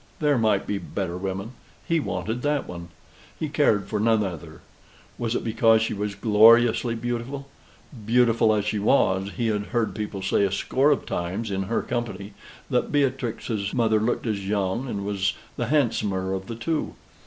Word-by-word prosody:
There 145 Hz, -4 st, +2 dB
might 110 Hz, -3 st, +2 dB
be 100 Hz, -, -2 dB
better 90 Hz, -1 st, -4 dB
women 95 Hz, +4 st, -4 dB, 0.4 s
he 165 Hz, -2 st, +2 dB
wanted 110 Hz, -, -3 dB
that 145 Hz, +1 st, 0 dB
one. 85 Hz, -1 st, -7 dB, 0.5 s
He 155 Hz, -, -1 dB
cared 125 Hz, -9 st, +2 dB
for 105 Hz, -, -2 dB
none 110 Hz, 0 st, +3 dB
other. 85 Hz, -4 st, -7 dB, 0.6 s
Was 120 Hz, 0 st, -1 dB
it -, -, -1 dB
because 115 Hz, 0 st, +3 dB
she -, -, -1 dB
was 105 Hz, 0 st, -3 dB
gloriously 115 Hz, +3 st, +5 dB
beautiful? 120 Hz, +4 st, -4 dB, 0.6 s
Beautiful 115 Hz, -1 st, +4 dB
as 105 Hz, -1 st, +1 dB
she 105 Hz, 0 st, -1 dB
was, 95 Hz, -3 st, +2 dB
he 120 Hz, -, 0 dB
had 105 Hz, -1 st, -1 dB
heard 120 Hz, -3 st, -1 dB
people 105 Hz, -2 st, -5 dB
say 95 Hz, -, +2 dB
a 100 Hz, -, +1 dB
score 130 Hz, +8 st, +2 dB
of 145 Hz, -, +1 dB
times 95 Hz, +5 st, -3 dB
in 95 Hz, 0 st, -2 dB
their 115 Hz, -, 0 dB
company 105 Hz, -4 st, -4 dB, 0.4 s
that -, -, +1 dB
Beatrix's 120 Hz, -7 st, -1 dB
mother 110 Hz, -3 st, +3 dB
looked 115 Hz, +4 st, -1 dB
as 100 Hz, -4 st, -2 dB
young, 100 Hz, +5 st, -1 dB
and 100 Hz, -4 st, -4 dB
was 100 Hz, -2 st, 0 dB, 0.2 s
the -, -, -2 dB
handsomer 105 Hz, -10 st, 0 dB
of 95 Hz, 0 st, -4 dB
the 115 Hz, -, -5 dB
two. 155 Hz, +7 st, -2 dB
110 Hz, 175 wpm, -25 LUFS, 100-120 Hz, 0.6 s, gloriously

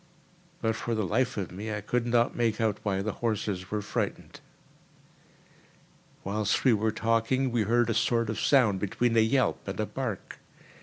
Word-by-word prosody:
But 115 Hz, -1 st, +1 dB
for 115 Hz, 0 st, -2 dB
the 110 Hz, -2 st, 0 dB
life 120 Hz, +6 st, 0 dB
of 95 Hz, -3 st, -3 dB
me 105 Hz, +4 st, -5 dB
I 105 Hz, -, -2 dB
could 120 Hz, +4 st, -1 dB
not 120 Hz, 0 st, +2 dB
make 115 Hz, -3 st, 0 dB
out 110 Hz, -2 st, 0 dB
why 95 Hz, -2 st, -1 dB
the 110 Hz, -, -1 dB
horses 105 Hz, -5 st, -2 dB
were 105 Hz, -1 st, -2 dB
frightened. -, -, -4 dB, 1.8 s
Whilst 105 Hz, +1 st, 0 dB
we 130 Hz, -, +5 dB
were 110 Hz, +1 st, +1 dB
talking, 115 Hz, +4 st, +1 dB
we 120 Hz, -1 st, +1 dB
heard 120 Hz, +2 st, +3 dB
a 115 Hz, -, +1 dB
sort 115 Hz, 0 st, +1 dB
of 110 Hz, -, -4 dB
sound 115 Hz, -9 st, +3 dB
between 115 Hz, +4 st, 0 dB
a -, -, +6 dB
yelp 120 Hz, +2 st, +1 dB
and 95 Hz, -, -5 dB
a 110 Hz, -, +1 dB
bark. 115 Hz, -5 st, -5 dB
110 Hz, 175 wpm, -28 LUFS, 105-120 Hz, 1.8 s, a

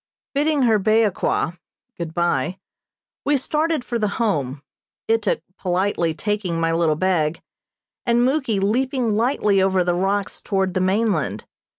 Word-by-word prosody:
Bidding 290 Hz, 0 st, +2 dB
her 225 Hz, -3 st, +4 dB
Beoqua 210 Hz, -5 st, +1 dB, 0.4 s
(good 170 Hz, -2 st, -5 dB
bye), 175 Hz, -1 st, 0 dB, 0.7 s
we 290 Hz, 0 st, +2 dB
started 305 Hz, +1 st, -1 dB
for 235 Hz, -, -2 dB
the 210 Hz, -, +1 dB
Home, 145 Hz, -, -1 dB, 0.4 s
Ituk 225 Hz, -2 st, +1 dB, 0.2 s
politely 180 Hz, -3 st, 0 dB
taking 195 Hz, -2 st, -2 dB
my 165 Hz, 0 st, +1 dB
little 165 Hz, -2 st, +2 dB
bag, 165 Hz, -2 st, +1 dB, 0.6 s
and 235 Hz, 0 st, +2 dB
Muky 260 Hz, -6 st, +1 dB
leaping 245 Hz, +4 st, +1 dB
lightly 210 Hz, -4 st, +2 dB
over 190 Hz, -1 st, +2 dB
the 175 Hz, 0 st, +1 dB
rocks 195 Hz, +3 st, -1 dB
toward 190 Hz, -2 st, 0 dB
the 185 Hz, -, 0 dB
mainland. 185 Hz, -, 0 dB
195 Hz, 130 wpm, -22 LUFS, 175-230 Hz, 0.7 s, her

